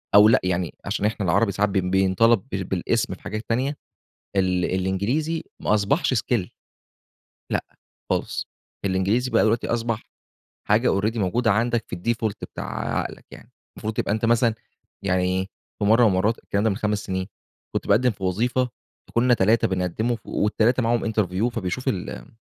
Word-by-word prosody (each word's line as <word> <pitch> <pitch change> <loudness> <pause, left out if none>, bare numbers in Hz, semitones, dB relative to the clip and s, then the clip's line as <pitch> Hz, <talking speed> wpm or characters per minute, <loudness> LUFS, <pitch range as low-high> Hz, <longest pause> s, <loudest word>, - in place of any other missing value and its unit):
أو 105 +1 +9
لأ 115 - +5
يعني 90 -2 -1
عشان 105 - -1
إحنا 105 -2 0
العربي 100 +5 +3
ساعات 100 +2 +1
ب - - -6
بينطلب 95 +4 +3
بالأسم 95 -2 -1
في - - -22
حاجات 110 +2 -5
تانية، 130 +5 0 0.6
ال 90 -2 +2
الإنجليزي 110 - -1 0.2
ما - - +2
أصبحش 105 - +2
skill، 115 -5 0 1.0
لأ - - 0 0.5
خالص، - - -1 0.4
الإنجليزي 100 +6 +1
بقى - - +4
دلوقتي 110 +1 +1
أصبح 115 -1 -1 0.7
حاجة 105 -1 +3
already 110 +3 -1
موجودة 115 +5 +1
عندك 115 +2 +1
في - - -4
الdefault 110 +3 -1 0.2
بتاع - - -3
عقلك - - -5
يعني، - - -14 0.2
المفروض 110 +1 -3
تبقى 105 - 0
أنتَ 110 +1 -1
مثلًا، 115 0 +3 0.5
يعني 90 -2 +2
إيه 95 +1 0 0.3
في - - +1
مرة 110 +4 +5
من - - +6
المرات 100 +4 +1
الكلام 100 +1 -2
ده 110 - +3
من 95 - -1
5 105 -2 -1
سنين 95 -1 -2 0.5
كنت - - -2
باقدم 125 +5 +4
في 100 -3 -7
وظيفة 120 +7 +1 0.4
فكنا 125 +1 +3
3 110 +1 +3
بنقدموا، 95 +6 -1
وال3 115 +4 +1
معاهم 115 -1 +1
interview 105 +1 +1
فبيشوف 115 +2 -3
ال 90 - -4
105 Hz, 160 wpm, -24 LUFS, 95-115 Hz, 1.0 s, أو